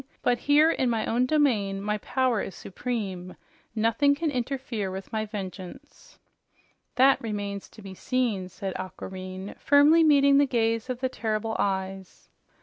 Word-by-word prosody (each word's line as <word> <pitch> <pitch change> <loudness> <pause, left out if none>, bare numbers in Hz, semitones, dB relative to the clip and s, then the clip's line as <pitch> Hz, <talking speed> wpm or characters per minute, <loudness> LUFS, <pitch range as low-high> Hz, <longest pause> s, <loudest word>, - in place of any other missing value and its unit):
"But 245 -1 +2
here 300 +4 +4
in 260 -5 0
my 225 -2 0
own 245 +2 +1
domain 230 -10 +1
my 210 +1 -2
power 255 -1 0
is 190 - -6
supreme. 190 -4 -5 0.4
Nothing 230 +6 +2
can 315 +1 -1
interfere 250 -5 -3
with 190 +4 -8
my 215 0 -1
vengeance." 205 +6 -9 0.8
"That 265 +2 +5
remains 205 -3 -4
to 215 - -15
be 195 -1 -8
seen," 220 -4 -1
said 190 +1 -5
Aquareine, 185 +1 -7
firmly 295 +3 +5
meeting 280 -2 +5
the 285 - +4
gaze 230 -1 0
of 255 0 -4
the 260 - +1
terrible 220 -2 -2
eyes. 190 -1 -3
225 Hz, 145 wpm, -26 LUFS, 195-260 Hz, 0.8 s, That